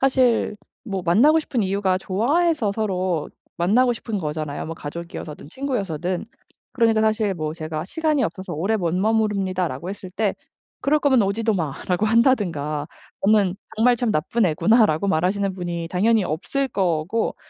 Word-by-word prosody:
사실 255 -5 +2 0.3
뭐 195 -4 -3
만나고 240 - +5
싶은 260 -7 -1
이유가 190 -1 +1
좋아해서 245 - +1
서로 185 -6 -1 0.3
만나고 225 +9 +3
싶은 220 -2 -4
거잖아요. 150 -2 -4
뭐 165 - -5
가족이어서든 155 -1 -8
친구여서든. 190 - -2 0.5
그러니까 225 -3 +3
사실 215 -2 +1
뭐 155 -2 -3
"제가 155 -1 -5
시간이 305 - 0
없어서 185 0 -5
오래 195 +9 0
못 175 -4 -1
머무릅니다."라고 190 -6 0
했을 195 -2 -8
때 205 +1 -1 0.5
"그럴 300 +2 +2
거면 265 -5 +4
오지도 220 +3 0
마."라고 180 +3 -1
한다든가 175 - +1 0.4
"너는 200 -3 +4 0.2
정말 245 +3 +4
참 235 -2 0
나쁜 200 +7 +1
애구나."라고 200 +1 +3
말하시는 190 +3 +1
분이 175 -2 -4
당연히 215 +2 +2
없을 270 - -2
거고 180 +2 -1
195 Hz, 360 characters per minute, -22 LUFS, 170-225 Hz, 0.5 s, 만나고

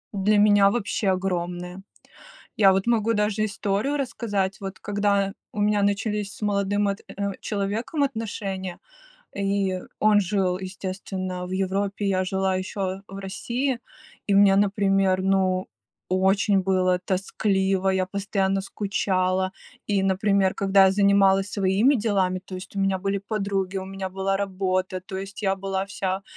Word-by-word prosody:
Для 205 +2 +3
меня 205 -1 +6
вообще 205 -1 -1
огромное. 180 -1 -2 0.7
Я 200 -5 +6
вот 190 +3 0
могу 230 -1 +2
даже 210 0 +1
историю 210 +6 -1
рассказать. 205 -8 -2
Вот 195 -1 -6
когда 200 -1 0 0.2
у 210 - -6
меня 205 0 +2
начались 205 0 0
с - - -14
молодым 205 0 +1
от 200 0 -2
э, 200 0 -3
человеком 215 +9 -2
отношения, 205 -7 -4 0.6
и 195 -1 0 0.2
он 215 -1 +5
жил, 185 -2 0
естественно, 185 -1 -5
в 180 - -7
Европе, 195 +2 -1
я 185 -1 +1
жила 190 0 0
еще 190 0 -3
в 195 - -9
России, 240 +7 -2 0.5
и 200 - +2
мне, 195 -1 +6
например, 195 -2 +2
ну, 190 -1 +1 0.4
очень 195 +2 +3
было 185 -1 +2
тоскливо, 190 0 0
я 190 -1 +1
постоянно 195 0 -1
скучала, 190 -2 -1 0.3
и, 200 -2 +1
например, 195 0 +2
когда 195 0 +4
я - - +4
занималась 200 0 +3
своими 200 +8 +3
делами, 195 -5 0
то 190 - -9
есть 185 +2 -8
у - - 0
меня 195 -1 +2
были 195 +1 -1
подруги, 200 -2 -2
у 190 - -3
меня 190 0 -5
была 195 +1 -1
работа, 185 -1 -1
то 190 0 -6
есть 195 +2 -7
я 195 -1 +2
была 195 0 -2
вся, 195 -1 -3
195 Hz, 145 wpm, -24 LUFS, 190-205 Hz, 0.7 s, меня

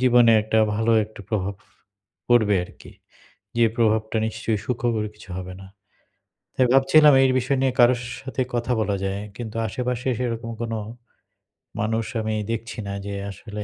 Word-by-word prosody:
জীবনে 120 -2 +5
একটা 110 +1 +1 0.2
ভালো 115 +1 +1
একটা 105 -1 -13
প্রভাব 100 -2 -1 0.7
পড়বে 110 -4 +4
আর - - -14
কি। - - -13 0.7
যে 120 - +5
প্রভাবটা 110 -1 +1
নিশ্চয়ই 110 -1 -2
সুখকর 120 -3 -1
কিছু 105 - -16
হবে 90 0 -6
না। 95 - -11 0.9
তাই 130 - +3
ভাবছিলাম 145 +2 +6
এই 130 - +4
বিষয় 130 +2 0
নিয়ে 135 -1 +2
কারো 120 +1 +7 0.3
সাথে 130 -1 -2
কথা 120 +1 0
বলা 105 -2 0
যায়। 95 +1 -2 0.2
কিন্তু 115 -2 -6
আশেপাশে 125 +3 -3
সেরকম 115 -2 -3
কোন 115 -1 -3 1.1
মানুষ 110 +1 0 0.2
আমি 110 0 -2 0.2
দেখছি 115 0 -4
না 100 - -4
যে 100 - -4 0.2
আসলে, 105 +1 -7
115 Hz, 155 wpm, -23 LUFS, 105-125 Hz, 1.1 s, কারো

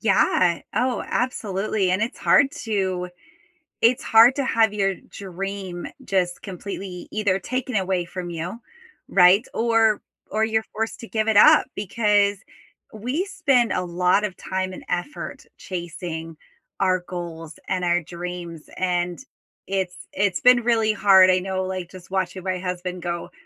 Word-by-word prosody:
Yeah, 185 -4 +3
oh, 250 0 0
absolutely, 205 -5 -1
and 185 - +1
it's 235 - -3
hard 275 - +4
to 190 -5 -1 0.7
it's 245 +4 +4
hard 230 +3 +7
to 280 - 0
have 225 -4 +3
your 195 -1 +1
dream 190 -1 -6 0.2
just 180 -2 -1
completely 190 -1 -7
either 205 -3 0
taken 255 +4 -4
away 190 -2 0
from 175 0 -6
you, 170 +7 -5 0.5
right, 190 +4 +6
or 225 -2 +2 0.3
or 215 +1 +1
you're 220 0 +1
forced 225 +3 -3
to 230 - -9
give 220 -1 -1
it 220 -2 +2
up, - - +7
because 205 -1 +1 0.5
we 250 - -2
spend 270 - +2
a 185 - 0
lot 180 +4 +2
of 190 -3 -3
time 185 0 -3
and - - -10
effort 180 +12 -4
chasing 170 -3 -6 0.4
our 185 -1 +2
goals 165 -3 -7
and 185 -1 -1
our 175 0 +2
dreams, 170 -1 -7
and 175 -1 -1 0.5
it's 190 -2 -2 0.2
it's 195 -2 0
been 250 0 +6
really 225 -2 +2
hard, 195 -2 +6
I 185 0 +3
know, 190 0 -2
like, 185 -2 -5
just 185 -2 -13
watching 185 -1 -2
my 185 -1 -1
husband 180 -1 -4
go, 170 -1 -4
190 Hz, 150 wpm, -23 LUFS, 180-220 Hz, 0.7 s, hard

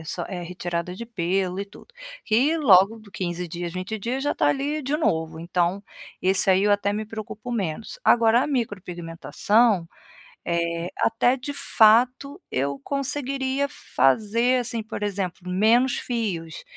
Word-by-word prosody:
s 160 +2 -6
é 180 -3 -6
retirada 175 0 -4
de 235 +5 -7
pelo 185 -2 -1
e - - -3
tudo. 230 - -17 0.3
E 270 +9 +3
logo 215 - +5
de 215 -2 -16
15 175 -1 -3
dias, 170 +1 -5
20 185 +4 -4
dias 250 +6 -2
já 290 - 0
tá - - +2
ali 290 +2 -1
de 280 +3 -1
novo, 160 - -1
então, 175 +3 -1 0.4
esse 190 +1 +3
aí 190 +2 +4
eu 205 - +4
até 205 0 +1
me 215 +1 -3
preocupo 220 +2 -7
menos. 210 - -4
Agora 230 +1 +4
a - - -1
micropigmentação, 195 - 0 0.6
eh, 170 0 -1
até 245 +3 +2
de 285 +3 -6
fato 255 - +3
eu 140 +1 -1
conseguiria, 275 0 -1 0.3
fazer 220 - +3
assim, 230 -2 -3
por 220 -1 -7
exemplo 190 -3 -3
menos 230 +7 +3
fios, 190 -10 -4
210 Hz, 150 wpm, -24 LUFS, 180-245 Hz, 0.6 s, logo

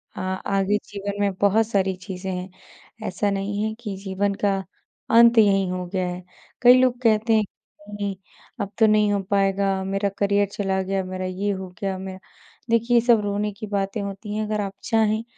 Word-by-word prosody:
अ, - - -7
आगे 195 +2 0
जीवन 200 0 -5
में 200 -1 +1
बहुत 210 +2 +4
सारी 195 -3 +1
चीज़ें 185 0 -6
हैं, 180 +1 -4 0.6
ऐसा 205 - -1
नहीं 200 +1 -2
है 220 0 -1
कि 210 -4 -4
जीवन 200 +1 -1
का 200 -1 +3 0.6
अंत 235 0 +7
यहीं 195 -3 +4
हो 180 0 -3
गया 185 -1 0
है। 180 +1 -5 0.4
कई 245 0 +9
लोग 250 -1 +2
कहते 225 -1 +3
हैं, 215 -1 +4 0.5
"नहीं, 200 -1 -3 0.5
अब 200 - -3
तो 220 - +7
नहीं 210 -1 +3
हो 200 - +1
पाएगा, 195 -1 +1
मेरा 195 +1 -1
करियर 200 0 +2
चला 195 -2 -1
गया, 195 0 -1
मेरा 185 0 -5
ये 190 +3 -2
हो 190 -1 -5
गया, 195 -1 -1
मेरा" 190 0 -7 0.5
देखिए 230 +1 +2
ये - - +5
सब 230 -3 +6
रोने 205 +1 -1
की 215 +2 -8
बातें 200 +1 -2
होती 200 +1 -5
हैं, 215 0 -1
अगर 210 0 -1
आप 195 -1 -4
चाहें, 220 0 +1
200 Hz, 190 wpm, -23 LUFS, 190-210 Hz, 0.6 s, कई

